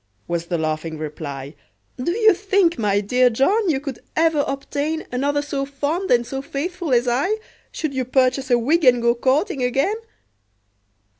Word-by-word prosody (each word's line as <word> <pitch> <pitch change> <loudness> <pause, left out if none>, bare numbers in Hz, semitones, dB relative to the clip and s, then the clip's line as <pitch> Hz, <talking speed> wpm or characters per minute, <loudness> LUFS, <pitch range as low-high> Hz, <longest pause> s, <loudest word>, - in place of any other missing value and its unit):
was 170 0 -2
the 170 - -1
laughing 155 0 -2
reply; 145 -2 -6 0.4
"Do 255 +6 -1
you 435 +2 +5
think, 380 - +1
my 205 -2 +2
dear 250 +5 +3
John, 370 - +2
you 280 -4 +1
could 275 -3 -6 0.2
ever 320 -2 +3
obtain 290 +3 -3
Another 285 +3 0
so 280 -1 -3
fond 290 +7 -2
and 240 -1 +3
so 270 +2 -4
faithful 325 +4 -4
as 245 0 +3
I, 280 - +1 0.3
Should 310 -4 -3
you 260 -1 -1
purchase 260 +1 +1
a 245 - +5
wig, 305 +8 +1
and 250 -2 +6
go 235 0 +3
courting 275 - 0
again?" 270 - +1
270 Hz, 165 wpm, -21 LUFS, 240-320 Hz, 0.4 s, and